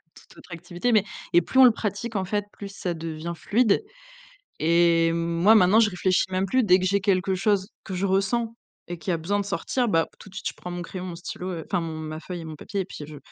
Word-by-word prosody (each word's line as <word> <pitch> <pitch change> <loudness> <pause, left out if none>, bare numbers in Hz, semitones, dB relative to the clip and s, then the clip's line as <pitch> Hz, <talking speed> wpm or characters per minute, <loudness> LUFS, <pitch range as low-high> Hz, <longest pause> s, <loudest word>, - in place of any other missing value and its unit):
tout - - -18
autre - - -16
activité. 175 +7 -3
Mais, 210 -2 +4 0.3
et 175 - +5
plus 260 - 0
on 265 - +10
le 245 - +8
pratique 215 +1 -3
en 190 - -1
fait, 205 +2 -1
plus 200 - -8
ça 180 -3 -3
devient 165 0 -5
fluide 220 -1 +2 0.8
et 165 0 +4
moi 170 +5 +3
maintenant 210 +2 +6
je 215 -2 +4
réfléchis 185 0 +1
même 185 +1 0
plus. 255 +6 +2
Dès 185 -3 +5
que 185 - -2
j'ai 200 +2 +2
quelque 190 -1 +1
chose 195 +1 +1
que 190 - -6
je 185 - -1
ressens 210 +4 0 0.3
et 175 -1 -6
qui - - -6
a 170 - +2
besoin 200 +6 -1
de 200 - -2
sortir, 240 +7 -1
bah, 165 -6 +2
tout - - -13
de 190 - -17
suite 190 - -4
je - - -10
prends 180 - -8
mon 175 0 -5
crayon, 185 +1 -7
mon 175 -2 -6
stylo, 180 +1 -6
heu, 165 - -5
enfin - - -1
mon 165 -1 -5
ma 155 0 -6
feuille 175 0 -7
et - - -8
mon 160 -1 -7
papier 195 +6 -4
et 185 - -4
puis 155 - -9
je 150 -1 -10
185 Hz, 255 wpm, -25 LUFS, 170-200 Hz, 0.8 s, on